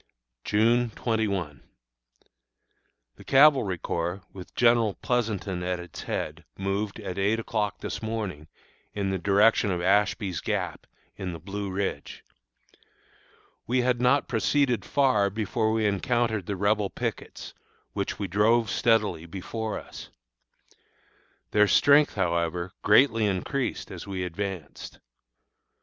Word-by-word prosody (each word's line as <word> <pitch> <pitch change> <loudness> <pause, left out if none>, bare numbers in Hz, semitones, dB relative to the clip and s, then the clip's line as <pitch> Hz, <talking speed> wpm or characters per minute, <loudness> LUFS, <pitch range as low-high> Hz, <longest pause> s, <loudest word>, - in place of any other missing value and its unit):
June 115 +3 +2
21. 100 - -2 1.6
The - - -13
Cavalry 135 - +5
Corps, 85 +3 -3
with 95 -2 -11
General 115 -4 +3
Pleasonton 105 -7 -2
at 90 0 -2
its 90 0 -9
head, 80 +2 -4
moved, 100 +2 -2
at 100 -3 -5
eight 105 +3 +1
o'clock 105 -3 -2
this - - -5
morning, 105 -9 -4 0.5
in 100 -2 -1
the 95 - -1
direction 100 +4 +3
of 90 -2 -1
Ashby's 95 -1 +1
Gap, - - -3 0.3
in 95 -2 -4
the 85 - -7
Blue 100 +4 -5
Ridge. 95 +1 -4 1.4
We 125 +1 +2
had 125 -1 +1
not 125 +3 +3
proceeded 125 +1 +1
far 130 -8 +2
before 110 +2 -1
we 110 -1 +1
encountered 110 0 0
the 100 - -2
Rebel 100 +1 +1
pickets, - - -5 0.4
which - - -3
we 100 - -3
drove 105 +3 +2
steadily 105 -8 +1
before 105 +5 -4
us. - - -10 1.4
Their 105 0 +4
strength, 145 +5 +5
however, 85 -1 -1
greatly 115 0 +4
increased 115 +8 -2
as - - -8
we 95 -2 -3
advanced. 90 -3 -6
105 Hz, 120 wpm, -26 LUFS, 95-115 Hz, 1.6 s, Cavalry